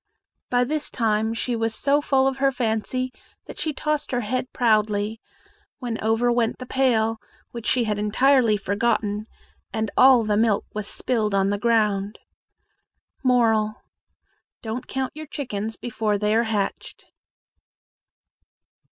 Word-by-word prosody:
By 245 0 +3
this 300 +4 -2
time 220 -1 0
she 240 +1 -1
was 225 -1 -1
so 285 +2 +2
full 270 -2 +2
of 270 0 -1
her 270 0 +2
fancy 250 +1 -1 0.3
that - - -10
she 315 - -1
tossed 300 0 -2
her 245 -1 0
head 250 +3 -3
proudly, 215 -2 +1 0.6
when 235 -4 -4
over 225 +2 +2
went 235 -1 +1
the 255 - -7
pail, 225 -4 +1 0.3
which 235 -1 -6
she 250 - +2
had 210 -2 -1
entirely 230 +1 +3
forgotten, 205 +1 -1 0.4
and 220 -1 -2
all 255 -2 +7
the 210 -1 +1
milk 220 -2 +2
was 210 -1 -4
spilled 215 -5 -1
on 195 0 +2
the 205 - -1
ground. 210 -3 +1 1.1
Moral. 225 -4 +3 0.9
Don't 225 +2 -5
count 265 0 -2
your 310 0 -8
chickens 225 -7 -4
before 220 -3 -1
they 210 +1 +1
are 230 +1 +3
hatched. 205 -3 -3
225 Hz, 140 wpm, -24 LUFS, 215-255 Hz, 1.1 s, all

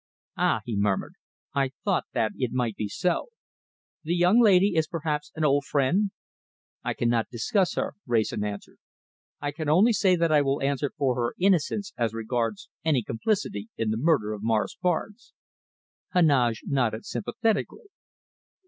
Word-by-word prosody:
"Ah!" 110 - +1
he 115 - -3
murmured. 100 -1 0 0.4
"I 135 -1 0
thought - - +1
that 110 - +1
it 125 -3 -2
might 120 -4 -1
be 105 - -3
so. 175 - -1 0.8
The 165 +2 0
young 180 +6 +4
lady 200 -3 +5
is 160 -1 +2
perhaps 155 -4 -3
an 155 -1 0
old 140 0 +2
friend?" 150 +10 +1 0.7
"I - - -2
cannot 120 -1 0
discuss 175 - 0
her," - - -2
Wrayson 110 -3 0
answered. 105 -1 -6 0.6
"I 145 - -2
can 150 0 -4
only 200 +10 +5
say 190 -3 +3
that 170 -2 +1
I 150 -1 +5
will 135 0 0
answer 140 0 0
for 135 -3 +2
her 120 -1 -2
innocence 195 +2 +1
as 115 -2 0
regards 115 -1 -2 0.2
any 150 -7 +2
complicity 115 - -2
in 110 -1 0
the 110 - -1
murder 125 -6 +2
of 105 - -7
Morris 110 -1 0
Barnes." 185 +6 -2 0.8
Heneage 130 - +3
nodded 120 -5 0
sympathetically. 225 - -2
140 Hz, 155 wpm, -26 LUFS, 115-175 Hz, 0.8 s, lady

